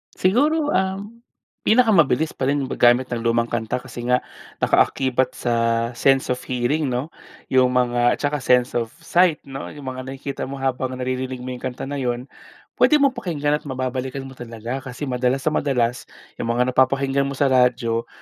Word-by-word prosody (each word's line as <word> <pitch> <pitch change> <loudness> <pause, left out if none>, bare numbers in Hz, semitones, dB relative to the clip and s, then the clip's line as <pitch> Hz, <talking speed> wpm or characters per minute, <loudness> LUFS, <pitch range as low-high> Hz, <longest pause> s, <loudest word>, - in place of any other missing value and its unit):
Siguro 295 +10 +2
um, 195 +4 -2 0.5
pinakamabilis 195 - +4
pa 130 - -3
rin 140 0 +1
yung 130 - -5
paggamit 120 +1 +3
ng 120 - -1
lumang 115 0 +1
kanta, 115 0 -1
kasi 125 -2 -7
nga 125 0 +2 0.4
nakaakibat 130 -1 +2
sa 120 - -2 0.4
sense 135 +2 +2
of 125 - -1
hearing, 130 +5 -1
'no? 130 +5 -3 0.4
Yung 130 -1 +4
mga 120 -1 +3
at - - -17
tsaka 145 0 0
sense 125 -1 +3
of 115 -1 -1 0.2
sight, 175 -1 +3
'no? 135 -1 -7
Yung 145 - -10
mga 130 0 -7
nakikita 135 0 -5
mo 135 - -6
habang 130 -1 -2
naririnig 130 0 -3
mo 130 - -5
yung 125 - -6
kanta 125 -1 -4
na 140 +1 -4
yun, 120 -1 -2 0.6
puwede 305 - +6
mong 275 -1 +5
pakinggan 150 -7 0
at - - -14
mababalikan 130 0 -3
mo 135 - -9
talaga, 115 +2 -5
kasi 135 +1 -8
madalas 130 0 0
na 155 - +1
madalas 125 -4 0 0.4
yung - - -2
mga 125 +1 +2
napapakinggan 135 +1 +2
mo 140 - -4
sa 135 0 +2
radyo, 120 -2 +2
130 Hz, 180 wpm, -22 LUFS, 125-145 Hz, 0.6 s, puwede